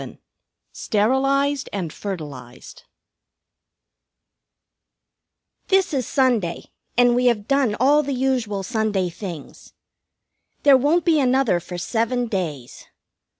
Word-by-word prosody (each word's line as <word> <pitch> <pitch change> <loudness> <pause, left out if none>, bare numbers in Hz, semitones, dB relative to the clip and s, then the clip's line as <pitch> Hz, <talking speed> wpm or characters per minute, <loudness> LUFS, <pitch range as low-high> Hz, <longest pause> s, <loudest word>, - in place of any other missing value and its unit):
VII - - -10 0.6
"STERILIZED 275 +6 0
AND 180 -6 -4
FERTILIZED" 145 -11 -8 2.8
This 385 -3 +2
is 260 -5 -1
Sunday, 235 -11 0 0.3
and 245 0 +5
we 250 0 +2
have 215 -4 0
done 275 -6 +1
all 285 +4 +4
the 280 -1 -3
usual 245 -6 -1
Sunday 210 -4 -1
things. 170 -5 -9 0.9
There 280 -2 +7
won't 295 +6 +2
be 325 -3 +3
another 260 -8 +2
for 175 +1 -8
seven 230 +6 -1
days. 165 - -5
240 Hz, 105 wpm, -22 LUFS, 190-270 Hz, 2.8 s, There